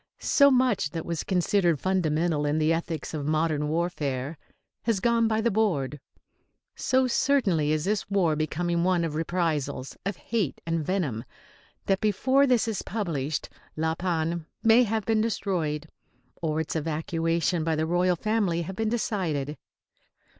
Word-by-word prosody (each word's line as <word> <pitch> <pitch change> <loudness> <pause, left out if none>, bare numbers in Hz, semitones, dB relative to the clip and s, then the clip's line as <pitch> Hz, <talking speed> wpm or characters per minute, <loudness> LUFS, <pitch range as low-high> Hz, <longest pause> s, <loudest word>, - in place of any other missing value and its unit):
So 280 -1 +5
much 250 - +2
that 165 +2 -5
was 170 -2 -3
considered 180 -3 +2
fundamental 165 -4 +1
in 145 +1 +1
the 155 +1 +3
ethics 165 -2 -3
of 150 -2 -3
modern 155 -1 +1
warfare 150 -4 -2 0.5
has 225 -4 0
gone 230 +2 +3
by 220 0 +1
the 235 - +1
board; 160 -10 0 0.8
so 260 0 +2
certainly 230 - +2
is 155 0 0
this 205 0 -1
war 180 -6 +2
becoming 170 +3 -1
one 180 -1 +2
of 165 -2 -2
reprisals, 160 -5 -2
of 195 -2 -3
hate 205 - -2
and 165 -1 -1
venom, 150 - -1 0.6
that 195 -1 +1
before 260 +7 +3
this 245 -3 +3
is 220 -4 -2
published 160 -9 -3 0.3
La 160 +1 +1
Panne 165 -2 -2 0.2
may 225 +2 +6
have 220 -1 -1
been 220 0 +2
destroyed, 165 -9 -1 0.5
or 155 -2 0
its 160 - -3
evacuation 165 +1 0
by 160 0 +1
the 155 +1 0
royal 175 +2 +2
family 195 -3 0
have 190 +3 -6
been 220 +1 0
decided. 175 - -1
170 Hz, 150 wpm, -27 LUFS, 155-205 Hz, 0.8 s, may